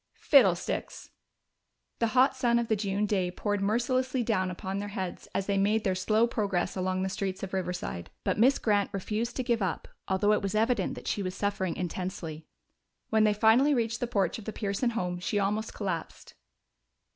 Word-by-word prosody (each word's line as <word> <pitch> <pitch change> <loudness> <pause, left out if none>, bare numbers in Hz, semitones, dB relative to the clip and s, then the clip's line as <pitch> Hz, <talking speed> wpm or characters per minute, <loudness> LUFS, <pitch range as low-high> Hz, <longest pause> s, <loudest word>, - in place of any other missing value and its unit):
"Fiddlesticks!" 195 - +2 0.9
The 230 - +2
hot 265 +1 +5
sun 240 -3 +2
of 235 -1 -1
the 220 - +3
June 200 0 -1
day 190 -4 0
poured 205 +2 -2
mercilessly 250 +4 +1
down 190 -5 0
upon 190 +2 -4
their 205 - -4
heads 185 -2 -4
as 195 - 0
they 200 -1 +1
made 210 +2 +2
their 190 - +1
slow 215 +5 +2
progress 200 -6 -1
along 185 0 -1
the - - 0
streets 190 0 -3
of 195 - -5
Riverside, 180 - -3
but - - 0
Miss 260 +5 +5
Grant 205 -2 +1
refused 215 +4 -2
to 255 - -1
give 235 -3 0
up, 185 -5 -2 0.2
although 205 +2 +2
it - - +1
was 200 +1 -2
evident 220 -2 +1
that - - -9
she 205 - -1
was 185 -1 -3
suffering 195 -4 -1
intensely. 175 -3 -5 0.6
When 220 -1 +4
they 210 - +4
finally 235 +7 +5
reached 225 -1 -1
the 245 - -1
porch 200 -4 0
of 215 - -11
the 220 - -4
Pearson 205 +3 -1
home 180 -2 -2
she 195 +3 -1
almost 205 +2 -1
collapsed. 185 -6 -5
205 Hz, 190 wpm, -29 LUFS, 185-225 Hz, 0.9 s, hot